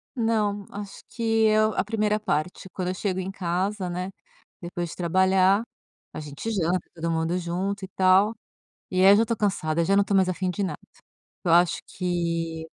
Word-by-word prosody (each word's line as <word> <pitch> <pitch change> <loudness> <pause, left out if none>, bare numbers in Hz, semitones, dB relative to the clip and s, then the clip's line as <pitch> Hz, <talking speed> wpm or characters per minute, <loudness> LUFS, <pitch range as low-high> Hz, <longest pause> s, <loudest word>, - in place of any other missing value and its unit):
Não, 215 -4 0
acho 200 -1 -8
que 235 - -9 0.2
eu 215 0 +3
A - - +1
1ª 215 0 0
parte, 180 -2 -2
quando 180 -1 -3
eu 185 - -1
chego 190 -1 -2
em 190 +1 -4
casa, 185 +1 -2
né, 180 +2 -3 0.5
depois 175 0 -4
de - - -8
trabalhar, 190 +3 +3 0.5
a - - -6
gente 150 +9 -6
janta 180 -3 +1
todo 165 0 -3
mundo 165 +2 0
junto, 190 +3 -3
e - - -11
tal. 190 +3 +4 0.6
E 185 - -4
aí, 195 - +9
eu - - +7
já 225 - +4
tô 230 0 -2
cansada, 170 -6 0
já 195 +3 +2
não 200 - +5
estou 200 0 0
mais 190 -1 +4
afim 185 0 -1
de 200 +3 -3
nada. 190 - -3 0.7
Eu 170 - +2
acho 170 -3 +4
que, 170 -3 -2
185 Hz, 190 wpm, -25 LUFS, 175-205 Hz, 0.7 s, aí